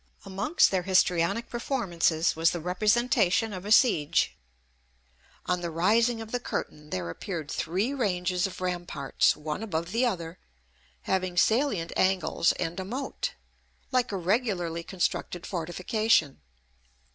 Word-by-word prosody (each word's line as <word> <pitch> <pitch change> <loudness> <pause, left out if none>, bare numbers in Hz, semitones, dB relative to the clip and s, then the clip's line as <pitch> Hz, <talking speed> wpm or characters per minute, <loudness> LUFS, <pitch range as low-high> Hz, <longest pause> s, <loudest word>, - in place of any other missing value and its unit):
Amongst 195 - +2
their 190 -2 +1
histrionic 185 +3 +2
performances 175 - 0
was 165 +1 +3
the 175 - -3
representation 210 - +2
of 185 0 -7
a 210 - -4
siege. 210 - +4 1.1
On 180 -1 0
the 170 - -3
rising 225 +8 +2
of 225 0 -9
the 245 - -1
curtain 150 -9 -5
there 90 - -3
appeared 160 - -5
three 195 - -1
ranges 180 -6 0
of 185 - -10
ramparts, 175 -6 0
one 150 +2 -4
above 170 -5 -3
the 245 +4 +2
other, 170 -5 -4 0.6
having 185 -1 -1
salient 215 -4 +2
angles 185 -3 +2
and 175 +1 -4
a - - -3
moat, 255 +8 -4 0.6
like 255 -2 +1
a 195 - -2
regularly 180 -4 0
constructed 175 0 -2
fortification. 175 -1 0
185 Hz, 130 wpm, -27 LUFS, 170-220 Hz, 1.1 s, siege